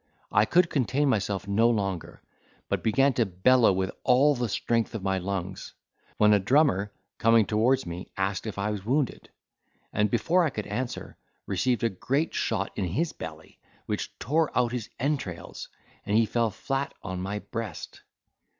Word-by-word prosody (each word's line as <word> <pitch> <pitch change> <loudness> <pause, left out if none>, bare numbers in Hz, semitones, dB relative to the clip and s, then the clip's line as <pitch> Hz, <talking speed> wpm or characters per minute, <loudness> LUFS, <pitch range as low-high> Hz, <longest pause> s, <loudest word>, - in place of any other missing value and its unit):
I 105 - +4
could 170 +8 +3
contain 135 +1 +1
myself 100 -4 -1
no 110 +4 +3
longer, 100 -6 -2 0.5
but - - 0
began 135 +5 +3
to 120 - +2
bellow 110 +7 +4
with 95 0 -1
all 135 +4 +5
the 120 -3 -2
strength 115 +3 0
of 105 - -4
my 95 -1 0
lungs; 95 0 -4 0.4
when 105 0 +5
a 105 - +5
drummer, 105 -3 +2 0.3
coming 115 -1 +5
towards 120 +6 +2
me 85 +1 -7
asked 95 +3 -1
if 105 - -5
I 100 +2 -1
was 105 -3 -4
wounded, 130 +4 -1 0.6
and, 105 0 +2
before 170 - +2
I 160 - +2
could 105 -6 -5
answer, 120 +4 -4 0.3
received 115 +4 0
a 115 - +3
great 135 - -1
shot 100 -4 -1
in 100 - -1
his 150 - -1
belly, 80 0 -9 0.3
which - - -4
tore 155 +5 +1
out 120 -1 +2
his 120 -3 -4
entrails, 130 - -3 0.3
and 105 - +1
he 115 - +5
fell 115 +1 +1
flat 135 +5 -3
on 95 -2 -4
my 100 +3 -3
breast. 110 -4 -6
110 Hz, 170 wpm, -27 LUFS, 100-130 Hz, 0.6 s, all